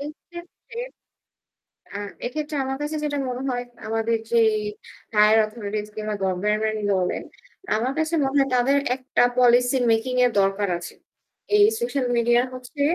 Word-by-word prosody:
এই 285 - -4 0.2
ক্ষেত্রে 345 +7 -11 1.2
আ - - -3 0.3
এক্ষেত্রে 300 +4 -4
আমার 270 0 -3
কাছে 295 +1 -3
যেটা 290 -1 -1
মনে 250 0 -4
হয় 245 -1 -2 0.2
আমাদের 225 +1 0
যেই 230 -2 +4 0.6
হায়ার 210 +1 +6
অথরিটিস 215 -1 -5
কিংবা 215 -1 -3
গভর্নমেন্ট 210 +4 0
এরই 215 -1 -3
বলেন, 180 -1 -1 0.5
আমার 245 +5 -1
কাছে 315 +1 -1
মনে 270 +1 -1
হয় 270 -1 +2
তাদের 270 +3 +3 0.2
একটা 260 -1 +1 0.2
পলিসি 245 +1 +4
মেকিং 240 +3 0
এর 245 - +2
দরকার 195 +1 0
আছে। 175 - -9 0.6
এই 410 0 +7
সোশ্যাল 285 - -1
মিডিয়া 240 +1 +4
হচ্ছে 255 +3 -8
245 Hz, 150 wpm, -23 LUFS, 215-275 Hz, 1.2 s, এই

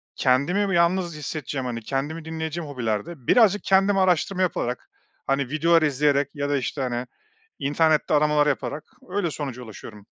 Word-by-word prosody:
kendimi 145 +11 +2
bir - - -1
yalnız 170 -1 +2
hissedeceğim, 145 -3 -4
hani, 120 -2 -3
kendimi 145 +7 -3
dinleyeceğim 160 -1 -4
hobilerde 125 +3 -4
birazcık 210 -4 +4
kendim 195 +1 +3
araştırma 185 0 +2
yaparak, 125 -8 -2 0.4
hani, 135 -1 0
videolar 165 +2 +3
izleyerek 145 -1 +2
ya 145 0 -2
da 145 - +2
işte, 135 +2 -3
hani, 125 -1 -2 0.5
internette 155 +2 +2
aramalar 150 0 +3
yaparak 145 +1 -2 0.3
öyle 185 -4 -1
sonuca 130 -5 -5
ulaşıyorum. 105 -2 -11
150 Hz, 145 wpm, -24 LUFS, 135-170 Hz, 0.5 s, birazcık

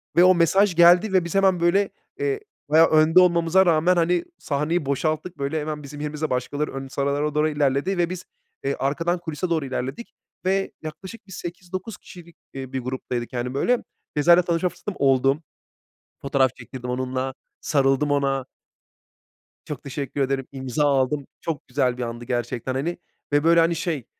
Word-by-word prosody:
Ve 175 - +7
o 185 0 +7
mesaj 175 +3 +3
geldi 175 +4 +6
ve 185 -2 +3
biz 170 - -5
hemen, 190 -2 +4
böyle, 190 +4 +3 0.3
eee, 420 0 0 0.3
bayağı 160 +2 +6
önde 155 +3 +5
olmamıza 175 +1 +4
rağmen, 170 +1 +3
hani, 175 0 +2
sahneyi 150 +3 -1
boşalttık, 155 +5 -1
böyle, 140 +3 -2
hemen 150 0 -4
bizim 145 +1 -9
yerimizde 150 +1 -3
başkaları 145 +4 -2
ön 135 0 -5
sıralara 140 +2 -1
doğru 155 +1 +3
ilerledi 145 +5 0
ve 175 -1 +1
biz, 185 0 -6 0.4
eee, 140 0 0
arkadan 165 +6 -1
kulise 170 +1 -4
doğru 160 -4 0
ilerledik. 135 - -5 0.3
Ve 195 +1 +1
yaklaşık 190 +8 -9
bir - - -14
8-9 185 +3 -6
kişilik, 170 -2 -14 0.2
iii, 135 -1 -7
bir 130 - -1
gruptaydık, 125 -1 -4
hani, 125 +1 -3
böyle. 240 - +1 0.3
Ceza'yla 170 +4 +6
tanışma 170 +1 0
fırsatım 205 +2 -7
oldu. 135 +2 +2 0.8
Fotoğraf 135 -2 +2
çektirdim 125 -2 -7
onunla, 130 +1 -2 0.3
sarıldım 140 0 +2
ona. 135 -2 +1 1.2
Çok 150 -4 -6
teşekkür 140 0 -4
ederim, 135 -1 -1
imza 130 +1 -2
aldım. 140 0 +1
Çok 160 -4 -4
güzel 125 -1 0
bir 125 - -3
andı 120 0 -6
gerçekten, 120 0 -2
hani. 160 +6 -2 0.4
Ve 145 0 +4
böyle, 170 +1 +5
hani, 165 +1 +3
şey, 160 -6 -3
150 Hz, 165 wpm, -23 LUFS, 135-175 Hz, 1.2 s, Ve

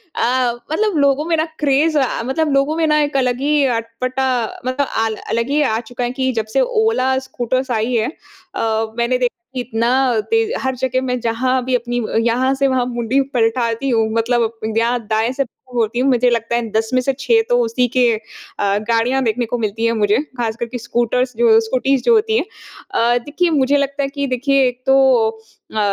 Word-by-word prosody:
अ, 245 0 +1 0.2
मतलब 410 +2 0
लोगों 280 +1 +2
में 335 0 +1
ना 315 - +1
क्रेज़ 300 +2 +2
अ, 260 -3 -1
मतलब 300 +4 0
लोगों 275 +3 +1
में 330 - +2
ना 300 0 +3
एक 290 -1 0
अलग 250 -2 0
ही 295 +1 +2 0.2
अटपटा 255 +3 -3 0.4
मतलब 265 +2 0
अ, 220 -1 -2
अलग 230 +2 0
ही 295 +2 +2
आ 225 -6 +1
चुका 245 0 -3
है 240 - -1
कि 260 0 +2
जब 220 -2 -1
से - - +4 0.2
ओला 265 -12 +1
स्कूटर्स 255 +2 -2
आई 230 +2 0
है 225 +2 +1 0.5
अ, 220 0 -1
मैंने 235 +2 +1
देखा 250 -1 0 0.2
कि 255 - -2
इतना 230 -1 -1 0.4
तेज़ 450 -1 +2
हर 265 0 -1
जगह 260 0 0
मैं 250 -1 -2
जहाँ 250 +3 0
भी 260 - +1
अपनी 240 0 -2 0.3
यहाँ 255 +3 +1
से 275 0 +1
वहाँ 260 -2 +1
मुंडी 240 +2 0
पलटाती 230 +2 0
हूँ 225 -3 +2
मतलब 230 0 +1 0.3
यहाँ 235 +2 +1
दाएँ 220 +2 +1
से 275 +1 0 0.3
होती 230 0 0
हूँ 270 +2 +2
मुझे 245 -1 +3
लगता 235 0 -1
है 235 -1 -2
10 220 +1 0
में 255 - +4
से 270 +2 0
6 235 -4 +3
तो 245 - +3
उसी 240 +2 +1
के 255 - +4 0.6
अ, 200 0 +1
गाड़ियाँ 240 +4 +2
देखने 240 +1 0
को 235 +2 -3
मिलती 220 +1 -2
हैं 230 - +3
मुझे 210 -2 +2 0.2
ख़ासकर 235 0 -2
के 245 +2 -6
स्कूटर्स 240 +2 -1
जो 225 -2 +5
स्कूटीज़ 260 +3 0
जो 475 - +4
होती 440 +1 +2
हैं। - - 0 0.5
अ, 240 -9 +2
देखिए 335 +4 0
मुझे 285 -1 +2
लगता 280 0 -1
है 275 - -2
कि 280 0 -3
देखिए 265 +1 +2
एक 245 0 -4
तो 270 - +5 0.3
अ, 220 0 -10
250 Hz, 205 wpm, -18 LUFS, 230-270 Hz, 0.6 s, जो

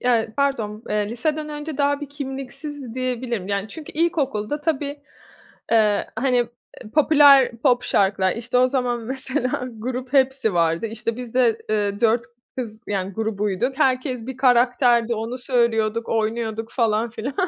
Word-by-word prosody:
ya, 235 -3 +2
pardon, 230 -7 -1
eee, 210 -1 0
liseden 300 +6 -2
önce 295 0 -6
daha 285 0 +2
bir 290 - -6
kimliksizdi 275 -1 -7
diyebilirim. 245 -5 -3
Yani, 200 +1 -1
çünkü 310 +5 -9
ilkokulda 295 -6 0
tabii, 290 -2 -2 0.7
eee, 215 -3 +3
hani, 250 +2 +1
eee, 240 -2 -5
popüler 285 -3 +6
pop 245 0 +2
şarkılar 190 -1 +2
İşte, 235 +2 -1
o 255 0 +5
zaman 250 -2 -1
mesela 255 +1 -2
Grup 250 +3 -5
Hepsi 265 -6 +2
vardı, 165 +3 +1
işte, 225 +1 -4
biz 245 -2 -7
de, 240 -3 +3
eee, 205 -1 0
4 230 0 +2 0.3
kız, 220 -4 -6
yani, 195 -1 -2
grubuyduk. 220 +4 -1
Herkes 255 -2 +1
bir 265 -1 -6
karakterdi, 245 -2 +3
onu 225 +3 -4
söylüyorduk, 230 -3 0
oynuyorduk 225 0 -2
falan 225 -1 +1
filan. 230 +5 -5
240 Hz, 145 wpm, -22 LUFS, 220-265 Hz, 0.7 s, popüler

